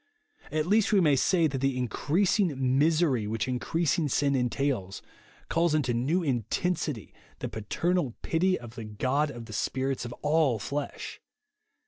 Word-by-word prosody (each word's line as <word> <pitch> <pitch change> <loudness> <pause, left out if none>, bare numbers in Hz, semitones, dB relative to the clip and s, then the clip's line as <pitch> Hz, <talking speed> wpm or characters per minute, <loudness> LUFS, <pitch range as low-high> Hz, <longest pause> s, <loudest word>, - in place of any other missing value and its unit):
At 155 0 0
least 210 +4 +3
we 205 - +5
may 150 -6 +4
say 170 +5 +3
that 135 -3 -1
the 135 -1 0
increasing 140 - +1
misery 150 -7 +2
whicli 115 +3 -2
increasing 155 +4 0
sin 140 +2 +2
entails, 125 -6 -1 0.4
calls 165 -1 +2
into 130 -6 +1
new 145 +10 +1
intensity 140 - -2 0.2
the - - -4
paternal 140 - -1
pity 185 +3 +1
of 120 -2 -10
the 115 -2 -7
God 130 +8 0
of 120 -4 -8
the 110 - -10
spiiits 130 +3 -1
of 120 - -6
all 150 -5 +3
flesh. 140 +7 -5
140 Hz, 145 wpm, -28 LUFS, 120-165 Hz, 0.4 s, we